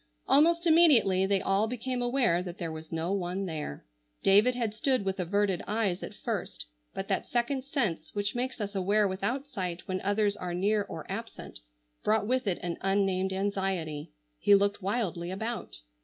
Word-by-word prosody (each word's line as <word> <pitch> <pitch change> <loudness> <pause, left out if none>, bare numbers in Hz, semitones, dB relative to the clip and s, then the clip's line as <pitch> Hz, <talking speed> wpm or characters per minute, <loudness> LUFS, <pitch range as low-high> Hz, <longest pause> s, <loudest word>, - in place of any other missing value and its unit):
Almost 335 +5 +4
immediately 260 - +5
they 195 -1 +1
all 195 +3 +2
became 250 +2 -3
aware 240 -8 +2
that 180 -1 -7
there 170 -3 -4
was 160 0 -9
no 165 +3 -1
one 190 0 -2
there. 155 - -5 0.4
David 210 +6 +5
had 230 -4 -1
stood 250 0 +1
with 190 0 -2
averted 195 0 +1
eyes 205 -4 0
at - - -7
first, - - -4 0.3
but - - -4
that - - -1
second 245 +2 0
sense 210 - -1
which 205 0 0
makes 255 +1 -3
us 205 -1 -3
aware 200 +2 +2
without 200 +9 -2
sight 185 -10 -5
when 185 0 -2
others 205 +1 +1
are 180 -3 -4
near 205 +4 +2
or - - -7
absent, - - -7 0.4
brought 215 -1 +2
with 255 0 0
it 185 - +1
an 175 -1 -3
unnamed 195 -1 +1
anxiety. 190 -6 -2 0.3
He 205 +3 +6
looked 200 +1 +1
wildly 190 -4 -1
about. 220 +5 -4
200 Hz, 170 wpm, -29 LUFS, 185-230 Hz, 0.4 s, He